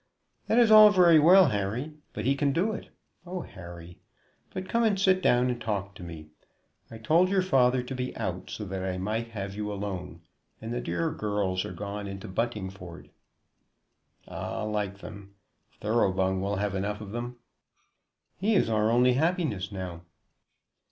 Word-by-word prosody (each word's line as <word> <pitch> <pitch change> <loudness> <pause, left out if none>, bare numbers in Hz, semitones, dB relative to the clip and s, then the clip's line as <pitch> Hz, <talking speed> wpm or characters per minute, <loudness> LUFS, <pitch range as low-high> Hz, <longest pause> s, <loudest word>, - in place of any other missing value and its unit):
"That 225 - +2
is 235 -2 +5
all 215 -1 +10
very 175 -5 +6
well, 180 +2 +7
Harry; 110 +8 -2 0.2
but - - -5
he 135 - +3
can 140 0 +1
do 185 +8 +1
it. 215 - -7 0.3
Oh, 180 0 -5
Harry! 85 - -11 0.5
But 185 0 -5
come 235 +3 +1
and 210 -4 +2
sit 190 -1 +3
down 125 -3 +3
and 120 -1 -5
talk 100 -3 -3
to 90 - -13
me. 80 -3 -9 0.6
I 115 - -9
told 165 +11 +3
your 190 -1 +2
father 130 -7 +3
to 125 - -6
be 125 0 -4
out, 95 -5 -4
so 105 - -5
that 95 -1 -4
I 95 -1 -2
might 110 +5 -2
have 100 -4 -6
you 105 0 -4
alone; 95 -5 -5 0.4
and 115 +2 -5
the 120 - -2
dear 165 +4 -1
girls 105 -9 -1
are - - -6
gone 100 +2 -5
into 95 +2 -7
Buntingford." 95 -4 -5 1.2
"Ah, - - -5
like 105 -2 -2
them! 100 -1 -11 0.5
Thoroughbung 95 -4 +1
will 100 +1 -1
have 100 0 -1
enough 100 +2 -2
of 105 -2 -8
them." 120 +2 -5 1.0
"He 215 +3 +1
is 150 - +2
our 110 0 +2
only 125 +2 +4
happiness 140 - 0
now." 90 -3 -6
110 Hz, 170 wpm, -28 LUFS, 95-145 Hz, 1.2 s, all